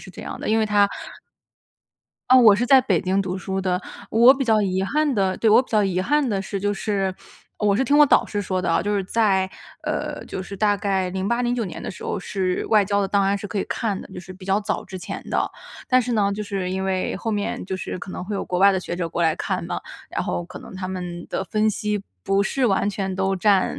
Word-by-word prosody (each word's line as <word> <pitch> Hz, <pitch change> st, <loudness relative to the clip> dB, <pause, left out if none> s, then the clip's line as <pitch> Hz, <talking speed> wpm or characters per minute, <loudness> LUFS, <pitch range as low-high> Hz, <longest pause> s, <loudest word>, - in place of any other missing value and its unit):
是 -, -, -11 dB
这 -, -, -10 dB
样 -, -, -7 dB
的， -, -, -4 dB
因 220 Hz, +1 st, +3 dB
为 220 Hz, -, +3 dB
它 205 Hz, -1 st, +3 dB, 1.4 s
呃， 255 Hz, -, +8 dB
我 230 Hz, -5 st, +8 dB
是 240 Hz, -, 0 dB
在 265 Hz, +1 st, +7 dB
北 195 Hz, -10 st, +1 dB
京 190 Hz, +2 st, +1 dB
读 185 Hz, 0 st, -3 dB
书 190 Hz, +1 st, -3 dB
的， 185 Hz, -1 st, 0 dB, 0.3 s
我 235 Hz, +4 st, +7 dB
比 270 Hz, -1 st, -2 dB
较 220 Hz, -2 st, +3 dB
遗 190 Hz, -1 st, 0 dB
憾 290 Hz, +6 st, +1 dB
的 190 Hz, -2 st, +1 dB
对， 225 Hz, -, +2 dB
我 220 Hz, +4 st, +6 dB
比 -, -, -19 dB
较 215 Hz, -2 st, +3 dB
遗 185 Hz, -2 st, 0 dB
憾 290 Hz, +6 st, +1 dB
的 195 Hz, -3 st, -1 dB
是 195 Hz, 0 st, -4 dB
就 205 Hz, +1 st, 0 dB
是 195 Hz, -3 st, -1 dB, 0.4 s
我 205 Hz, -1 st, +2 dB
是 265 Hz, -, +1 dB
听 285 Hz, +3 st, +3 dB
我 295 Hz, -, +8 dB
导 285 Hz, -, +4 dB
师 205 Hz, -1 st, -3 dB
说 185 Hz, -1 st, -1 dB
的 180 Hz, -, -2 dB
哦， -, -, +2 dB
就 205 Hz, +1 st, 0 dB
是 195 Hz, -, -1 dB
在， 195 Hz, -3 st, +2 dB, 0.4 s
呃， -, -, -3 dB
就 190 Hz, -, -5 dB
是 200 Hz, +1 st, -8 dB
大 205 Hz, 0 st, +2 dB
概 195 Hz, -2 st, 0 dB
08-09 235 Hz, +5 st, 0 dB
年 180 Hz, -, -7 dB
的 -, -, -6 dB
时 185 Hz, -, -8 dB
候 -, -, -2 dB
是 185 Hz, -2 st, -2 dB
外 210 Hz, -2 st, +4 dB
交 200 Hz, +1 st, +1 dB
的 195 Hz, -, +1 dB
档 200 Hz, 0 st, +2 dB
案 200 Hz, +1 st, +1 dB
是 205 Hz, -, -6 dB
可 205 Hz, -, -4 dB
以 -, -, -2 dB
看 210 Hz, -4 st, -2 dB
的， -, -, -11 dB
就 185 Hz, -, -7 dB
是 185 Hz, +1 st, -9 dB
比 185 Hz, 0 st, -13 dB
较 195 Hz, +2 st, +1 dB
早 210 Hz, 0 st, -3 dB
之 190 Hz, -, -8 dB
前 175 Hz, -, -6 dB
的。 -, -, +1 dB, 0.4 s
但 255 Hz, 0 st, +4 dB
是 245 Hz, +1 st, -3 dB
呢 200 Hz, -2 st, +2 dB
就 210 Hz, -, -3 dB
是 195 Hz, -3 st, -3 dB
因 190 Hz, +1 st, -2 dB
为 190 Hz, -1 st, -1 dB
后 225 Hz, +4 st, -3 dB
面 205 Hz, -3 st, -2 dB
就 190 Hz, -, -3 dB
是 185 Hz, -, -5 dB
可 185 Hz, -, -8 dB
能 180 Hz, -, -5 dB
会 205 Hz, +2 st, -4 dB
有 195 Hz, -, -2 dB
国 180 Hz, -, -2 dB
外 195 Hz, +1 st, +6 dB
的 190 Hz, -, 0 dB
学 175 Hz, -, -5 dB
者 175 Hz, -2 st, -2 dB
过 170 Hz, +1 st, -2 dB
来 160 Hz, -1 st, +2 dB
看 -, -, -2 dB
嘛， -, -, -3 dB, 0.3 s
然 -, -, -2 dB
后 175 Hz, -, -2 dB
可 180 Hz, -, -10 dB
能 -, -, -12 dB
他 185 Hz, 0 st, -5 dB
们 180 Hz, -2 st, -5 dB
的 190 Hz, -, -2 dB
分 215 Hz, +3 st, +1 dB
析 210 Hz, -1 st, -2 dB, 0.2 s
不 195 Hz, 0 st, +2 dB
是 255 Hz, +6 st, +1 dB
完 200 Hz, -1 st, +1 dB
全 190 Hz, -2 st, -3 dB
都 190 Hz, 0 st, 0 dB
占 195 Hz, 0 st, +2 dB
200 Hz, 280 characters per minute, -23 LUFS, 190-215 Hz, 1.4 s, 呃